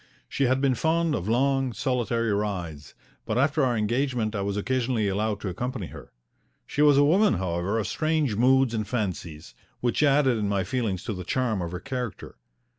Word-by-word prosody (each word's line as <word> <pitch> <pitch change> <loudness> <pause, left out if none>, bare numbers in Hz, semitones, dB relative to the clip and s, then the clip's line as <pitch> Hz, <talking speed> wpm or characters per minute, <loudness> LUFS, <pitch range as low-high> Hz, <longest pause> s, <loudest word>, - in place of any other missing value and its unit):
She 140 - 0
had 130 +1 +2
been 135 -2 +3
fond 165 +4 +1
of 105 -5 -2
long, 135 +1 +1
solitary 115 -1 0
rides, 90 -8 -4 0.3
but 110 0 -2
after 145 +3 +2
our 125 -3 +1
engagement 120 0 0
I 100 - -1
was 100 +1 -2
occasionally 120 -1 0
allowed 105 +1 -1
to - - -4
accompany 120 +3 -4
her. - - -12 0.5
She 145 - -2
was 145 -2 +6
a 145 - +6
woman, 190 - +4
however, 90 +3 -1
of 110 - -1
strange 155 - 0
moods 130 +2 +3
and 110 -2 -2
fancies, 90 -8 -4 0.3
which 120 +3 0
added 140 -5 +3
in 105 -1 -1
my 100 -2 0
feelings 105 -2 -2
to 110 - -3
the 90 -1 -6
charm 110 0 -1
of 85 -1 -4
her 90 - -5
character. 125 0 -6
115 Hz, 190 wpm, -26 LUFS, 100-135 Hz, 0.5 s, was